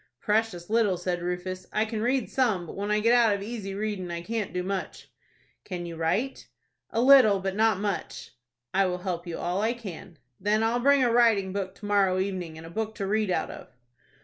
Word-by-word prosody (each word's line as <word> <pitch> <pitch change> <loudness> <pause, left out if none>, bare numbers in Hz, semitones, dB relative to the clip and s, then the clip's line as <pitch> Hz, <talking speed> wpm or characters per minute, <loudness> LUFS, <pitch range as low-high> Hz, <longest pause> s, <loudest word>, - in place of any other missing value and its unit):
"Precious 210 -5 0
little," 215 -4 +2
said 175 0 -2
Rufus. 180 +1 -4
"I 215 - +1
can 220 -1 -4
read 255 +3 +1
some, 220 -9 +1
but - - -9
when 200 +1 -3
I 210 0 +2
get 230 +2 +4
out 230 -4 +5
of 200 - -5
easy 205 -3 -5
reading 205 -3 -3
I 170 0 -4
can't 220 0 -3
do 180 0 -2
much." 195 0 -5 0.5
"Can 180 -3 -5
you 170 -1 -6
write?" 185 +12 -1 0.4
"A 225 - -2
little, 250 -6 +7
but 190 0 -3
not 220 -2 +3
much." 205 -1 -4 0.4
"I 195 0 +3
will 180 0 -2
help 180 -1 -4
you 170 - -4
all 180 +3 -1
I 225 +2 +1
can." 195 -7 -9 0.2
"Then 210 +2 +1
I'll 230 +2 +1
bring 280 +1 +4
a 240 - +3
writing 220 -6 +3
book 195 -1 -3
to 205 - -11
morrow 200 -2 +3
evening, 185 -4 -3
and 160 - -10
a 165 - -10
book 220 +3 -3
to 200 - -3
read 215 +1 0
out 180 - -1
of." - - -10
200 Hz, 215 wpm, -27 LUFS, 180-225 Hz, 0.5 s, little